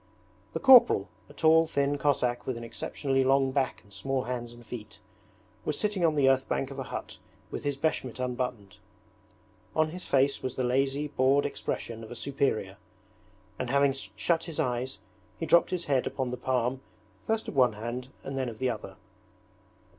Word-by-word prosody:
The - - -2
corporal, 255 - +7 0.2
a - - -13
tall 160 +2 +5
thin 140 -1 0
Cossack 125 -4 +1
with 130 -2 -2
an 115 - -7
exceptionally 135 +3 -1
long 135 0 +3
back 130 -1 -1
and 100 -2 -20
small 130 +7 -1
hands 120 -1 -4
and 120 0 -14
feet, 110 -3 -8 0.7
was 150 - -1
sitting 210 -4 0
on 160 -2 +3
the 140 -2 +4
earth 135 0 +3
bank 135 0 -1
of 135 - -7
a - - -3
hut - - -6 0.3
with - - -5
his 145 -1 -1
beshmet 130 -5 -1
unbuttoned. 125 -6 -3 1.0
On 155 0 +2
his 180 +2 -7
face 140 +1 +2
was 130 - -3
the 130 - -1
lazy, 135 +3 +1
bored 140 0 +3
expression 115 -4 -4
of 110 - -9
a 120 - -7
superior, 125 -9 -1 0.8
and 125 - -2
having 140 +1 +3
shut 165 +4 -1
his 165 -3 -6
eyes 125 +1 -1 0.4
he 165 - -3
dropped 170 - +5
his 180 -2 -1
head 135 -3 +1
upon 130 -2 -2
the - - -2
palm 125 +1 -1 0.5
first 220 0 0
of - - -5
one 125 -4 +5
hand 120 +4 -5 0.2
and 135 - -5
then 130 -2 -1
of 110 - -9
the 130 0 +1
other. 110 -2 -7
130 Hz, 185 wpm, -29 LUFS, 125-145 Hz, 1.0 s, corporal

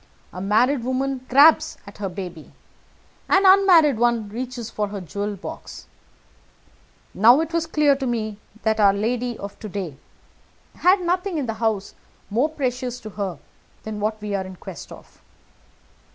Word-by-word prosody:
A 180 - -6
married 235 +6 +2
woman 260 +1 -2
grabs 310 +4 +5
at 200 0 -13
her 200 -2 -2
baby 180 -3 -8 0.8
an 385 - +4
unmarried 360 - +6
one 235 -3 +1
reaches 240 +1 -5
for 210 -2 -2
her 200 0 -6
jewel 200 +4 -4
box. 195 - -9 1.3
Now 235 +7 +6
it 325 +1 -3
was 335 -1 0
clear 300 -3 +3
to 270 -1 -3
me 215 -3 -3 0.2
that 220 0 +1
our 200 -2 +6
lady 240 +3 -2
of 200 0 -8
to 215 - -7
day 180 -8 -5 0.8
had 370 +2 +4
nothing 360 +1 -1
in 285 - -1
the 225 - -2
house 220 -3 -2 0.4
more 250 +9 +2
precious 255 -4 -3
to 215 - -8
her 195 -3 -4 0.5
than 215 -1 -5
what 215 +1 -2
we 210 -1 -5
are 195 -1 -1
in 185 0 -9
quest 170 - -10
of. - - -14
230 Hz, 160 wpm, -23 LUFS, 205-275 Hz, 1.3 s, unmarried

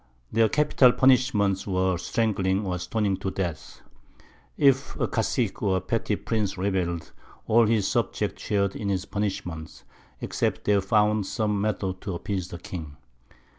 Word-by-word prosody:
Their 110 0 +3
capital 145 -4 +4
Punishments 120 -8 +3
were 95 -1 +1
Strangling 100 -1 0
or 90 -1 -2
Stoning 100 +1 -1
to 95 - -3
Death. 85 -6 -5 0.8
If 140 -1 +2
a - - +1
Caicque - - -1
or 95 -2 +2
petty 105 +3 -1
Prince 105 -2 -2
rebell'd, 90 -3 -2 0.3
all 115 0 +4
his 110 -3 +2
Subjects - - -1
shar'd 100 -1 0
in 100 - -3
his 95 -2 -1
Punishment, 90 -6 -4 0.4
except - - -2
they 100 -1 +3
found 105 0 +2
some 105 -3 -1
Method 95 -3 -2
to 95 -3 -4
appease 95 0 -3
the 85 - -7
King. 80 -4 -8
100 Hz, 140 wpm, -26 LUFS, 95-110 Hz, 0.8 s, capital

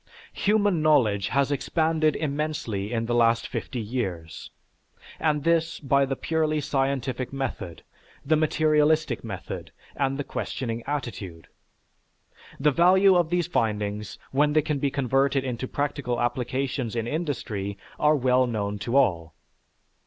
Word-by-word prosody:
Human 205 -4 +2
knowledge 115 -11 +3
has 140 +1 +1
expanded 155 +1 +1
immensely 140 -9 -2
in 115 -1 -1
the 120 - -1
last 115 -1 +3
fifty 125 - -4
years, 95 - -4 0.7
and 150 -2 +1
this 165 0 +1
by 140 -1 +2
the 135 - -1
purely 155 +1 0
scientific 135 -2 -1
method, 130 -11 -5 0.4
the 155 +3 +3
materialistic 155 -3 +2
method, 95 -6 -6 0.2
and 135 -1 0
the 145 - -2
questioning 115 -4 -4
attitude. 105 - -5 1.1
The 150 +2 +4
value 185 +5 +5
of 175 -2 +2
these 175 -1 +1
findings 105 - -2
when 145 +2 +2
they 155 -1 +3
can 150 -2 -1
be 140 - +1
converted 135 0 +1
into 130 -1 -3
practical 140 -4 -2
applications 125 0 -2
in 115 -1 -1
industry 115 - -3 0.2
are 150 0 +4
well 130 -2 +3
known 105 -3 -2
to 120 +6 0
all. 85 - +1
135 Hz, 130 wpm, -26 LUFS, 115-155 Hz, 1.1 s, value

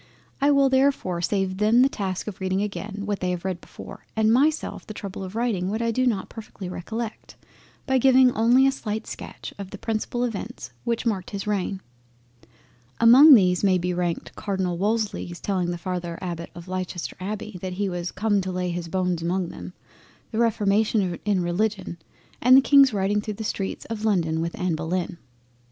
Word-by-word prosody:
It 285 +1 +4
will 275 -1 +5
therefore 265 -9 +2
be - - -5
saving 190 -2 -1
them 220 +4 +4
the - - +5
task 190 -8 -3
of 205 -2 -7
reading 190 +1 0
again 205 0 -5
what 205 -1 -2
they 180 - -1
have 180 0 -3
read 185 -2 -3
before, - - -12
and 220 0 +3
myself 300 +5 +1
the 215 - -7
trouble 195 -1 -6
of 190 +2 -8
writing 220 -6 0
what 215 +2 -2
I 230 0 0
do 255 +3 +1
not 205 -6 0
perfectly 215 -4 -9
recollect, 220 +6 -6 0.5
by 265 -1 +2
giving 260 0 +6
only 240 +4 +4
a 270 - +4
slight 220 -5 -4
sketch - - -8
of 195 -2 -6
the - - -8
principal 225 +2 -2
Events 200 - -5
which 235 0 -1
marked 200 -6 -1
his 200 -2 -5
reign. 200 -2 -2 1.2
Among 260 +6 +9
these 180 -4 +3
may 190 -2 +4
be 180 0 -1
ranked 175 -1 -3
Cardinal 190 -3 -2
Wolsey's 205 -4 -1
telling 185 -3 -1
the 175 - -2
father 175 -1 -4
Abbott 170 -2 -5
of 170 +1 -10
Leicester 185 -1 -4
Abbey 205 0 -5
that 185 -1 -4
"he 200 +2 -1
was 175 -1 -3
come 205 0 +1
to 185 0 -4
lay 180 -1 -2
his 170 -1 -4
bones 180 -1 -1
among 175 +1 -1
them," 180 - -9 0.6
the 220 - -2
reformation 205 -4 +1
in 200 -4 +1
Religion 185 0 -2 0.4
and 255 +2 +7
the - - +8
King's 275 -1 +6
riding 205 0 0
through 210 0 -5
the 220 - -6
streets 195 -2 -3
of 220 -2 -5
London 165 -7 +1
with 170 +1 -3
Anna 180 -3 0
Bullen. 170 +2 -3
200 Hz, 190 wpm, -24 LUFS, 180-225 Hz, 1.2 s, Among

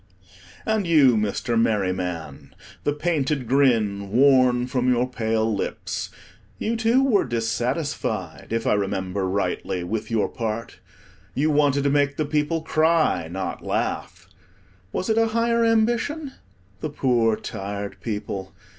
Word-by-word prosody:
And 220 -4 0
you, 145 -7 +5
Mr. 110 +2 0
Merryman, 90 -8 -2 0.3
the 145 - +3
painted 150 -4 -1
grin 110 -7 +2
worn 130 +1 +4
from 125 0 +1
your 125 0 +2
pale 110 -2 0
lips, - - -4 0.5
you 225 +2 -1
too 230 +4 +3
were 235 -7 +3
dissatisfied, 115 - -2
if 115 0 -1
I - - +3
remember 95 -1 -1
rightly, 95 -2 -1
with 110 +4 -3
your 115 -2 +1
part. 115 -1 -4 0.6
You 150 +4 +2
wanted 145 -1 +3
to 140 - +2
make 145 0 +2
the 155 - 0
people 150 +2 0
cry, 155 - +2
not 95 +3 -5
laugh. - - -3 0.6
Was 185 - -2
it 220 0 +2
a 225 - +3
higher 235 0 +2
ambition? 235 +6 +1 0.5
The 155 - -3
poor 120 -6 +2
tired 100 0 -6
people! 100 -3 -4
125 Hz, 130 wpm, -24 LUFS, 105-155 Hz, 0.6 s, you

